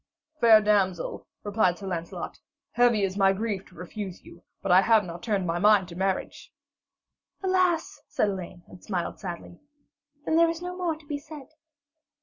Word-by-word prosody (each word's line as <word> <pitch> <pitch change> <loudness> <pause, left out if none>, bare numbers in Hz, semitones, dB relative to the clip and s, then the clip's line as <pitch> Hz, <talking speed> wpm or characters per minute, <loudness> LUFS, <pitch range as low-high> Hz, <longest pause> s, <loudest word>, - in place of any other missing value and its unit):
'Fair 225 -4 +7
damsel,' 200 -4 0 0.2
replied 205 -4 +1
Sir 200 - -9
Lancelot, 170 -3 -5 0.3
'heavy 240 -4 +3
is 195 +1 -1
my 195 0 +5
grief 205 -1 -3
to 180 - -20
refuse 185 +2 -7
you, 170 - -15 0.2
but 195 - 0
I 185 +1 +8
have 220 0 +4
not 170 0 -8
turned 205 -5 -1
my 170 0 -1
mind 205 -1 +5
to 170 - -9
marriage.' 190 +1 -3 0.9
'Alas,' 370 -3 +1
said 210 - 0
Elaine, 180 -2 -6
and 180 - -15
smiled 180 -4 -3
sadly, 175 -2 -7 0.7
'then 320 - +2
there 335 0 +5
is 330 0 -3
no 360 +1 -6
more 350 -3 -1
to 310 -1 -18
be 290 -1 -4
said.' 295 -1 -12
205 Hz, 170 wpm, -27 LUFS, 185-260 Hz, 0.9 s, I